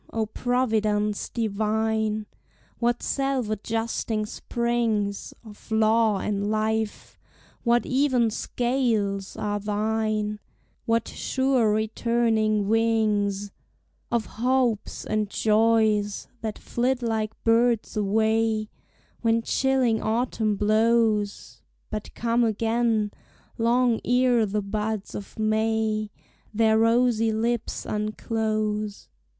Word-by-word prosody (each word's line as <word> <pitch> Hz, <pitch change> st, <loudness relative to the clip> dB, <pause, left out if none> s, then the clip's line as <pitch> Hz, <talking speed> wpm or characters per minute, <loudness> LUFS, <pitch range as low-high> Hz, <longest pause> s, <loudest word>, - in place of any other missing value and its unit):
O 225 Hz, -1 st, 0 dB
Providence 215 Hz, -3 st, 0 dB
divine! 220 Hz, 0 st, -1 dB, 0.5 s
What 240 Hz, 0 st, 0 dB
self 270 Hz, -5 st, -1 dB
adjusting 225 Hz, 0 st, -2 dB
springs 225 Hz, -3 st, -1 dB
Of 210 Hz, -1 st, -14 dB
law 220 Hz, -1 st, +3 dB
and 200 Hz, +1 st, -2 dB
life, 220 Hz, 0 st, -2 dB, 0.4 s
what 240 Hz, 0 st, +3 dB
even 255 Hz, -4 st, +2 dB
scales, 225 Hz, -6 st, -1 dB
are 205 Hz, 0 st, -2 dB
thine, 215 Hz, 0 st, -1 dB, 0.5 s
What 230 Hz, 0 st, +1 dB
sure 260 Hz, -5 st, +1 dB
returning 220 Hz, -1 st, +1 dB
wings 210 Hz, -3 st, +1 dB, 0.6 s
Of 235 Hz, -2 st, +1 dB
hopes 245 Hz, -2 st, -1 dB
and 215 Hz, -1 st, -1 dB
joys, 215 Hz, -1 st, +2 dB
that 220 Hz, -2 st, -4 dB
flit 250 Hz, +1 st, -1 dB
like 220 Hz, -2 st, -1 dB
birds 230 Hz, 0 st, +2 dB
away, 220 Hz, +1 st, +1 dB, 0.5 s
When 230 Hz, 0 st, +2 dB
chilling 260 Hz, -3 st, +1 dB
autumn 220 Hz, -2 st, 0 dB
blows, 215 Hz, 0 st, +1 dB, 0.3 s
But 215 Hz, -1 st, -5 dB
come 235 Hz, +1 st, +1 dB
again, 225 Hz, -1 st, +1 dB, 0.5 s
long 235 Hz, 0 st, +2 dB
ere 245 Hz, -2 st, +3 dB
the 205 Hz, +1 st, -2 dB
buds 210 Hz, 0 st, -3 dB
of 200 Hz, -, -8 dB
May 220 Hz, 0 st, 0 dB, 0.4 s
Their 220 Hz, 0 st, +3 dB
rosy 230 Hz, 0 st, +3 dB
lips 230 Hz, +1 st, -2 dB
unclose! 215 Hz, -1 st, -2 dB
220 Hz, 95 wpm, -25 LUFS, 215-235 Hz, 0.6 s, law